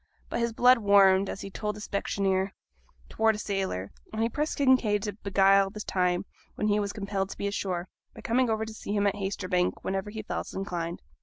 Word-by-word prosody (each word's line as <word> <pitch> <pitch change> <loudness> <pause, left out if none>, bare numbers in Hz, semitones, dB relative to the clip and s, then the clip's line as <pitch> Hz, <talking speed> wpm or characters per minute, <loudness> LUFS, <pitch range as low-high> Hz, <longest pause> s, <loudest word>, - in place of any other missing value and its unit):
But - - -2
his 235 0 0
blood 245 +2 +5
warmed, 200 -2 +5
as - - -5
he 195 - -7
told 210 +1 -3
the - - -9
specksioneer, 195 -1 -1 0.5
towards 220 0 +2
a - - -6
sailor, 190 - -2 0.2
and 220 +1 -1
he 230 - +1
pressed 300 +5 -2
Kinraid 250 -7 +3
to 210 - -3
beguile 195 -1 +3
the 210 +2 -7
time 180 -2 0 0.3
when 210 - 0
he 205 0 +3
was 200 -1 -1
compelled 195 -1 -3
to - - -8
be - - -3
ashore, 185 -3 -2 0.3
by - - -10
coming 245 +1 +1
over 220 0 0
to 220 - -8
see 205 - -5
him 205 0 +2
at 200 - +3
Haytersbank, 190 -2 -1
whenever 195 +2 -2
he 215 +1 -6
felt - - -4
inclined. 175 -3 -4
200 Hz, 210 wpm, -28 LUFS, 195-215 Hz, 0.5 s, blood